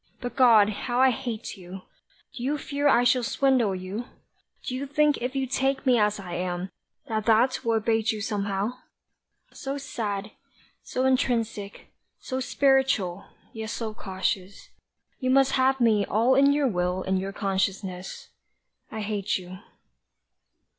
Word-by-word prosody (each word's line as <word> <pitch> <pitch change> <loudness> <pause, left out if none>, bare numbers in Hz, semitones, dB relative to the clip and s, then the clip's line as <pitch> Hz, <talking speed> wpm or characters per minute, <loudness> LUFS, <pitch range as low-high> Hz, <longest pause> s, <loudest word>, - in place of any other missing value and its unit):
But 245 -1 -6
God, 230 -6 +6
how 240 +4 -2
I 260 0 +6
hate 235 -3 -5
you! 185 0 -10 0.5
Do - - -7
you 280 +4 0
fear 285 0 -1
I 245 -3 +5
shall 250 +1 +3
swindle 245 -4 +2
you? 190 +6 -5 0.6
Do 255 - -3
you 270 +2 -3
think 295 +1 +2
if 250 +2 -3
you 270 -1 0
take 270 +1 -1
me 250 -3 +4
as 210 0 +1
I 180 -3 -7
am, 180 +1 -3 0.4
that 220 -2 -2
that 240 +4 +3
will 230 -2 +1
abate 225 0 +1
you 215 - -4
Somehow? 205 +2 -2 0.7
so 275 +1 -4
sad, 215 -6 -4 0.5
so 255 +1 -2
intrinsic, 230 -6 -1 0.3
so 260 -1 -4
spiritual, 265 -9 +1 0.3
yet 220 -1 -5
so 225 -2 -4
cautious, 190 -1 -4 0.5
you 255 - -1
Must 270 +1 +4
have 265 0 +2
me 220 -4 +3
all 230 +7 +2
in 275 +1 +5
your 285 -1 +2
will 180 -3 -1
and 190 0 0
your 195 +1 -4
consciousness 190 -2 -3 0.6
I 220 - -4
hate 205 -2 -1
you. 185 0 -10
225 Hz, 150 wpm, -26 LUFS, 195-260 Hz, 0.7 s, God